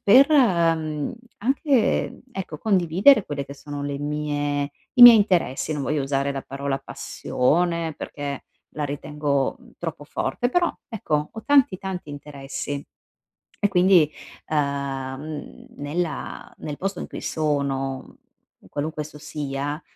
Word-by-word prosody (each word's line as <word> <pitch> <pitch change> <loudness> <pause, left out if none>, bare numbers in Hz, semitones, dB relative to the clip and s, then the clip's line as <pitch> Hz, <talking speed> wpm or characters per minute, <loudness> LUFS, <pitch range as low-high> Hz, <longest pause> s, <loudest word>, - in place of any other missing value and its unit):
per, 260 +8 +7
mhmm, 165 - +2 0.3
anche, 265 +2 +1
ecco, 175 -6 -5
condividere 195 - +4
quelle 145 -2 -3
che 140 - -9
sono 145 0 -7
le 140 -1 -3
mie 145 -1 -1 0.2
i 245 - +7
miei 240 -2 +13
interessi. 180 -8 +1
Non 145 - -2
voglio 150 0 0
usare 140 0 0
la 135 -1 -4
parola 135 0 -3
passione 165 +6 0
perché 140 -2 -5 0.3
la 150 - -1
ritengo, 145 -1 -1
mhmm, - - -18
troppo 165 -3 -5
forte, 245 +10 -1
però 345 +5 +2 0.2
ecco 150 -9 -1
ho 220 - -8
tanti, 275 -9 +4
tanti 190 -5 -5
interessi. 140 0 -6 0.8
E - - +6
quindi, 180 -5 +5 0.4
uhm, 140 0 -3
nella 150 +1 -4
nel 150 -1 -5
posto 195 +1 -3
in - - -4
cui - - -7
sono, 140 -3 -2 0.5
qualunque 155 +2 -3
esso 150 0 -11
sia, 145 0 -4
150 Hz, 130 wpm, -24 LUFS, 140-180 Hz, 0.8 s, miei